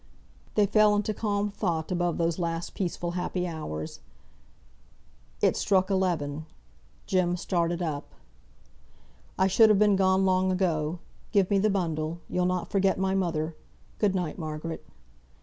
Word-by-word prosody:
They 210 - +5
fell 210 +1 +4
into 210 +1 0
calm 205 -1 -1
thought 170 -5 -2
about 175 -1 0
those 165 0 0
last 170 0 -3
peaceful 175 -2 -3
happy 180 0 -2
hours. 150 - -5 1.4
It - - +3
struck 190 -1 +2
eleven. 160 -6 -1 0.6
Jem 180 -2 +1
started 175 -1 -1
up. 150 -3 -4 1.2
"I 190 - +3
should 215 +4 +5
have 210 - +5
been 210 0 +4
gone 190 0 +3
long 185 0 +2
ago. 170 -3 0 0.3
Give 195 -3 +3
me 200 - +4
the 215 +2 +3
bundle. 165 -4 -1
You'll 180 0 0
not 180 -1 -2
forget 195 -1 +2
my 190 0 0
mother. 165 -4 -1 0.4
Good 200 -3 +2
night, 180 -3 -2
Margaret." 155 0 -5
180 Hz, 140 wpm, -27 LUFS, 165-195 Hz, 1.4 s, They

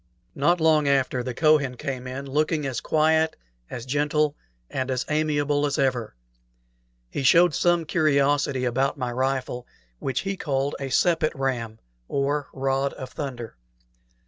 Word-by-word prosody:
Not 170 +6 +2
long 155 -2 +3
after, 135 -2 +2
the 125 -1 -5
Kohen 150 -4 +3
came 130 -3 -4
in, 135 +2 -5
looking 150 +2 0
as 130 -3 -3
quiet, 160 +1 +2 0.3
as 120 -1 -6
gentle, 145 +2 +1 0.3
and 130 - -3
as 130 -1 -1
amiable 145 -1 +1
as 145 0 0
ever. 125 - 0 1.0
He - - -3
showed 170 +5 +5
some 175 +2 +2
curiosity 140 -5 +2
about 130 +3 0
my 125 -1 -2
rifle, 130 -1 -2 0.3
which 135 -2 -2
he 195 0 -3
called 140 -3 -1
a 135 -1 -4
sepet 160 +2 +2
ram, 120 -5 -2 0.3
or 140 +1 -1
"rod 135 +1 -1
of 130 - -8
thunder." 120 - -6
140 Hz, 145 wpm, -25 LUFS, 130-150 Hz, 1.0 s, showed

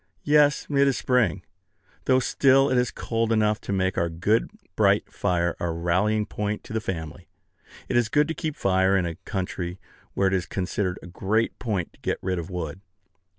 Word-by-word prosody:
Yes, 150 0 +4
it 140 -1 +3
is 135 - +1
spring; 110 -8 +1 0.6
though 130 - +4
still 135 +1 +3
it 130 - +3
is 125 - +1
cold 115 -1 -2
enough 110 -1 +2
to - - -5
make 95 -1 0
our 85 - +1
good 90 +7 +1 0.3
bright 100 -1 +2
fire 85 -3 0
a 85 - -1
rallying 90 +6 +1
point 105 0 -3
to - - -9
the 110 - -1
family. 85 -4 -6 0.6
It - - -2
is 120 -2 +3
good 150 +3 +3
to 165 - -2
keep 155 -3 -4
fire 95 0 +2
in 90 - +1
a 85 - -3
country 90 -2 -4 0.4
where 100 - +2
it 95 - +1
is 95 -2 0
considered 95 0 -2
a - - -9
great 100 +6 -1
point 100 -8 -2
to - - -24
get - - -1
rid 95 -1 -1
of 85 - -6
wood. 90 -1 -5
100 Hz, 195 wpm, -25 LUFS, 90-115 Hz, 0.6 s, Yes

